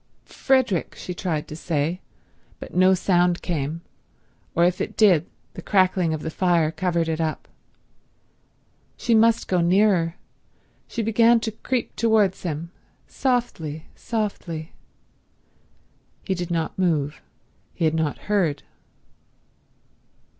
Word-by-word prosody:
"Frederick—" 260 -10 0
she 180 - -6
tried 165 -4 -3
to 150 - -8
say; 160 +2 -2 0.6
but - - -10
no 185 +1 +5
sound 180 -1 +2
came, 160 -1 -3 0.7
or 170 - +3
if 180 +1 +2
it - - -4
did 180 -7 +4 0.3
the - - -8
crackling 185 -3 +2
of 155 -1 -3
the 160 - -3
fire 170 -3 +2
covered 170 0 -1
it 160 0 -1
up. 160 -1 -3 1.5
She 235 - 0
must 225 +1 +4
go 180 -2 +2
nearer. 175 -2 +3 0.7
She 230 - -3
began 230 +2 +4
to 225 - -2
creep 245 +3 -3
towards 215 -5 +2
him—softly, 170 - -4
softly. 190 -8 -4 1.5
He 190 - -1
did 175 -1 -4
not 165 +1 -2
move. 155 -5 0 0.5
He 165 - -2
had 155 - +2
not 160 -2 -1
heard. 190 -8 0
175 Hz, 120 wpm, -23 LUFS, 160-205 Hz, 1.5 s, no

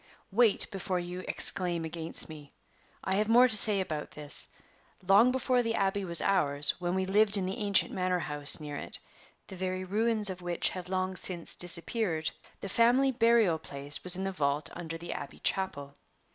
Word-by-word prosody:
Wait 225 0 +2
before 190 -2 -3
you 175 +1 -7
exclaim 175 -3 0
against 160 0 +3
me. 150 -3 -13 0.5
I 190 0 -1
have 215 +1 -1
more 245 +2 +5
to 225 - +4
say 210 -1 +7
about 155 -5 -5
this. 150 -1 0 0.6
Long 210 +6 +5
before 255 -1 0
the 230 -1 -3
Abbey 195 -1 -1
was 170 -3 +1
ours, 145 -7 +1
when 175 0 -3
we 190 0 -1
lived 205 +2 +3
in 190 - -2
the 190 +1 -5
ancient 200 -2 +1
manor 185 0 -1
house 150 -4 +2
near 150 -1 -8
it - - -3 0.5
(the 190 - -11
very 185 0 -4
ruins 215 +1 +1
of 180 -1 -9
which 175 -1 -1
have 180 -1 -8
long 185 0 -3
since 175 -1 +1
disappeared), 175 -1 0 0.3
the - - -6
family 245 +6 +2
burying 230 -8 +2
place 140 -1 -3
was 180 0 +5
in 190 - -5
the 195 - -3
vault 145 -4 -2
under 165 -1 -7
the 170 +1 -7
Abbey 145 - -9
chapel. 145 -8 -3
185 Hz, 185 wpm, -29 LUFS, 165-205 Hz, 0.6 s, say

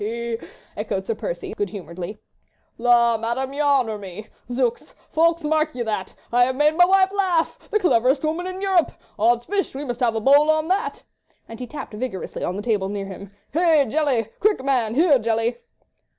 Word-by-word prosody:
he! 235 +2 -3
he! - - 0
he!" - - -13 0.3
echoed - - -3
Sir 460 - -1
Percy, - - -5
good 410 - -2
humouredly. 185 +1 -7 0.6
"La, 235 -1 +4
Madame, 240 +4 -2
you 290 - -2
honour 260 -7 +2
me! 195 +1 -8 0.3
Zooks! 245 -1 -1 0.2
Ffoulkes, 335 +1 +2
mark 310 0 0
ye 245 - -2
that! 210 -4 -4 0.2
I 245 0 +5
have 260 +1 -2
made 300 +3 +3
my 355 +1 +7
wife 380 +1 +4
laugh!—The 380 +1 0
cleverest 270 - +2
woman 325 +4 -1
in 370 +1 -6
Europe!... 375 -4 +2 0.3
Odd's 235 +2 +3
fish, 400 -7 -2
we 285 +2 -4
must 245 -2 -4
have 235 -3 +1
a - - +1
bowl 285 +6 +5
on 310 +1 +2
that!" 385 +2 -1 0.4
and 225 0 -10
he 250 - -5
tapped 290 -3 -8
vigorously 210 -3 -5
on 180 - -2
the 205 - -5
table 205 -4 0
near 200 -1 -4
him. 195 0 -9 0.2
"Hey! 320 -3 +4
Jelly! 255 -5 0
Quick, 415 -9 +2
man! 245 -5 0
Here, 305 -3 +5
Jelly!" 230 +1 0
255 Hz, 195 wpm, -22 LUFS, 225-315 Hz, 0.6 s, my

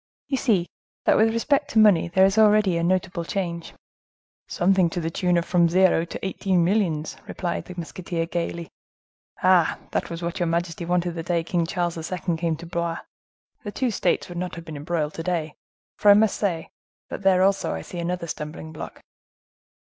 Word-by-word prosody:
"You 270 - 0
see 210 -10 +2 0.4
that, - - +5
with 225 +1 +4
respect 280 +5 +1
to 230 - -2
money, 205 -6 +6
there 190 +3 +4
is 195 +3 +2
already 210 -4 +5
a 170 - 0
notable 180 -1 0
change." 170 -2 -4 0.7
"Something 185 -1 +2
to 175 - -3
the 165 -1 -3
tune 180 +1 +1
of 170 - 0
from 175 -2 +3
zero 180 -1 +3
to 170 - -7
eighteen 190 -2 +1
millions," 170 -6 0
replied 175 -2 -3
the 180 - -9
musketeer 170 0 -4
gayly. 170 0 -4 0.7
"Ah! 185 -2 +4
that - - -2
was 170 0 -6
what 170 0 -3
your 175 - +1
majesty 170 0 -2
wanted 175 0 0
the 165 -1 -5
day 170 0 -1
King 170 -1 -1
Charles 170 -2 -3
II. 180 -1 -1
came 165 0 -1
to 165 +2 -10
Blois. 170 -1 -2 0.7
The 205 - -5
two 250 +2 -1
states 185 -4 0
would 175 -1 -6
not 180 0 -4
have 170 0 -9
been 160 -2 -8
embroiled 150 +1 -2
to - - -5
day; 165 -3 -2 0.5
for 210 - +5
I 200 - +9
must 215 0 +3
say, 175 -6 -2 0.4
that - - -5
there 190 -1 +4
also 195 - +1
I 80 - -6
see 175 - -7
another 175 0 -2
stumbling 155 0 -6
block." 155 - -9
175 Hz, 195 wpm, -24 LUFS, 170-190 Hz, 0.7 s, I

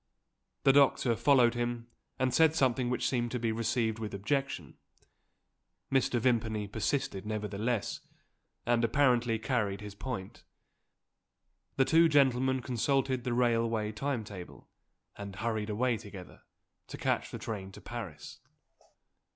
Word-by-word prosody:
The 135 - +6
doctor 135 -4 +4
followed 125 -2 +4
him, 120 -1 -2 0.3
and 130 -1 0
said 160 -1 +5
something 130 -4 +2
which 125 - 0
seemed 120 -2 0
to 125 - -1
be 115 -1 0
received 115 0 0
with 110 -2 -4
objection. 135 +8 -2 1.1
Mr. 130 -2 +2
Vimpany 110 -3 0
persisted 110 -1 -2
nevertheless, 105 +1 -2 0.7
and 120 -1 +2
apparently 120 -2 +3
carried 110 -5 -1
his 105 -1 -7
point. 100 -3 -6 1.3
The 135 - +3
two 165 +2 +5
gentlemen 130 -3 +3
consulted 130 +1 0
the 125 - 0
railway 115 -3 +1
time 125 +1 -2
table, 95 -4 -10 0.5
and 100 -2 -7
hurried 110 0 -2
away 115 +3 +1
together, 100 -3 -11 0.5
to - - -8
catch - - -1
the - - -6
train 95 -4 -6
to - - -10
Paris. 95 -11 -8
120 Hz, 125 wpm, -31 LUFS, 110-130 Hz, 1.3 s, The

